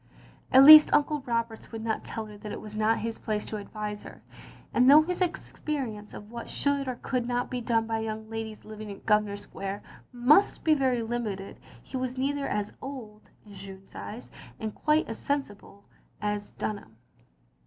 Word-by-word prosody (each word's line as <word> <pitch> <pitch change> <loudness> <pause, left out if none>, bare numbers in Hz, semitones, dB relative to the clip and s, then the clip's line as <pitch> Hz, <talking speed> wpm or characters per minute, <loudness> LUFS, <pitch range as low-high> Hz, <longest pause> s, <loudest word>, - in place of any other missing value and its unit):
At 265 +1 +8
least 305 +1 +11
Uncle 295 0 +2
Roberts 230 -1 -2
would 225 -1 -6
not 220 -1 -1
tell 225 -1 -5
her 210 -1 -11
that 205 0 -8
it - - -5
was 215 0 -9
not 215 +1 +2
his 230 -1 -4
place 210 -1 -2
to 215 - -5
advise 210 0 -6
her; - - -12 0.5
and 250 +1 +5
though 300 +2 +9
his 360 +3 -3
experience 270 - -3
of 210 +1 -10
what 235 -1 -7
should 280 -1 0
or 255 - -2
could 250 -2 -1 0.2
be 250 -1 -2
done 225 -1 +1
by 225 0 -1
young 220 0 -4
ladies 220 -1 -6
living 215 0 -8
in 200 - -8
Grosvenor 210 -1 +2
Square 200 0 -6 0.3
must 255 +10 +4
be 315 - +5
very 260 -5 +1
limited 220 -4 -4 0.2
he 265 - -6
was 255 0 -3
nearly 280 +2 0
as 210 -6 -2
old 235 -6 -9 0.2
(in 205 - -13
Jeanne's 195 0 -11
eyes), 230 +4 -8 0.3
and 220 -2 -4
quite 305 +1 +2
as 225 - -6
sensible 205 -8 -4 0.3
as 210 0 -2
Dunham. 200 - -6
225 Hz, 180 wpm, -28 LUFS, 210-260 Hz, 0.5 s, least